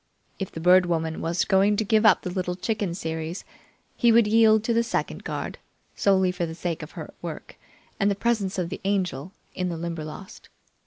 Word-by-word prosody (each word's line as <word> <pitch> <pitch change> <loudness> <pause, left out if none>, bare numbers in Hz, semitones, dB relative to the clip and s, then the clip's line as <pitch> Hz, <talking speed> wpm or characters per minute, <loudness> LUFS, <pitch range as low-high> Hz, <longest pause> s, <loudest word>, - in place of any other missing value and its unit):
If 195 - -4
the - - -7
Bird 180 +2 +5
Woman 160 -1 -1
was 170 +1 0
going 200 +2 +3
to 220 - +1
give 220 +1 +4
up - - +5
the 180 - -3
Little 180 -1 -2
Chicken 200 -2 -2
series, 160 0 -4 0.5
he 235 -2 +4
would 230 0 +6
yield 220 0 +5
to 235 - 0
the 230 - +3
second 235 - -3
guard, - - -5 0.4
solely 190 -2 +3
for 180 -1 -3
the 160 - -7
sake 170 -1 -3
of 155 - -9
her - - -8
work - - -7 0.4
and 200 -1 +3
the 200 - +1
presence 205 -3 0
of 175 -2 -1
the - - -6
Angel 185 -6 -1 0.2
in 180 -1 -2
the 170 - -4
Limberlost. 165 +2 -7
185 Hz, 200 wpm, -25 LUFS, 170-210 Hz, 0.5 s, would